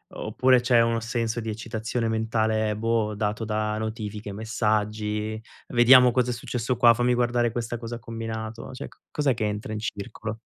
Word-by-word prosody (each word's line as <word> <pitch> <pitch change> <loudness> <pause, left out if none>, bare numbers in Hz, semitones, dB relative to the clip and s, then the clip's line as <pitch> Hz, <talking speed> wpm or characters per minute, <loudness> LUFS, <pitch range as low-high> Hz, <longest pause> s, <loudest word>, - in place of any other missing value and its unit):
O - - -6
oppure, 130 0 +4
c'è 120 -1 +4
uno 115 0 +1
senso 115 0 -2
di 115 -1 -4
eccitazione 115 +2 -3
mentale, 110 -1 0
boh, 110 -1 0
dato 105 +2 -2
da 105 0 -1
notifiche, 110 -1 -5
messaggi, 110 0 -1 0.3
"Vediamo 125 +1 +7
cosa 125 +1 +1
è - - -1
successo 120 +1 -2
qua," 120 -1 +7
"Fammi 125 +1 +2
guardare 120 -1 +1
questa 120 +1 -3
cosa 115 0 -6
ha 120 - -8
combinato," 115 -1 -6
cioè 135 - -7
co - - -23
cos'è 145 -3 +1
che 110 -1 -2
entra 105 +1 -3
in 105 - -3
circolo? 110 +1 -5
115 Hz, 175 wpm, -25 LUFS, 110-120 Hz, 0.3 s, Vediamo